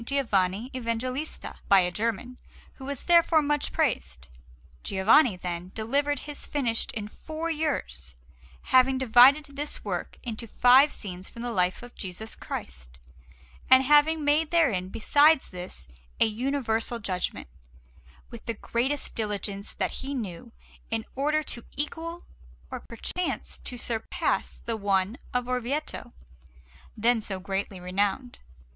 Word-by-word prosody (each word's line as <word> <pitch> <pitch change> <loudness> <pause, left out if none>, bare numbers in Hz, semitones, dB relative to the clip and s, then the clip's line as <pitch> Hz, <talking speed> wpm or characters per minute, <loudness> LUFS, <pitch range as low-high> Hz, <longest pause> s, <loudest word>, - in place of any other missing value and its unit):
Giovanni 230 -4 0
Evangelista 255 +4 -4
by 195 -1 +7
a 180 0 0
German, 230 +5 -3 0.4
who 265 - -9
was 280 -1 -5
therefore 335 -2 +5
much 295 0 0
praised. 65 - -1 0.5
Giovanni, 215 - +4
then, 180 0 -5
delivered 280 +6 0
his 295 -1 -6
finished 240 -6 0
in 210 -2 -4
four 315 +8 -5
years, 70 - -3 0.5
having 260 +1 +4
divided 265 +4 +6
this 290 +1 -4
work - - -4
into 230 -1 -5
five 255 +6 +6
scenes 185 -2 -6
from 235 - -9
the 245 - -2
life 180 0 0
of 245 - -11
Jesus 195 +3 -7
Christ, - - -7 0.7
and 260 +1 +8
having 295 +2 +4
made 300 +2 +3
therein, 240 - +2
besides 285 +8 +4
this, 180 - -8 0.3
a - - +6
Universal 235 0 -1
Judgment, 185 - -3 0.8
with 235 -2 -11
the 230 - -1
greatest 260 +6 -2
diligence 205 -2 -3
that - - -2
he 275 +1 -4
knew, 190 -9 -6 0.4
in 110 - -2
order 300 +3 +1
to 235 -5 -4
equal 330 +4 -2 0.5
or - - -4
perchance 345 +10 -3
to 250 - -5
surpass 230 -2 -2
the 230 - -1
one 200 +3 0
of 250 0 -1
Orvieto, 250 +4 -3 0.9
then 230 +1 +3
so 195 -3 -4
greatly 195 0 -3
renowned. 200 +7 -2
235 Hz, 130 wpm, -27 LUFS, 200-280 Hz, 0.9 s, and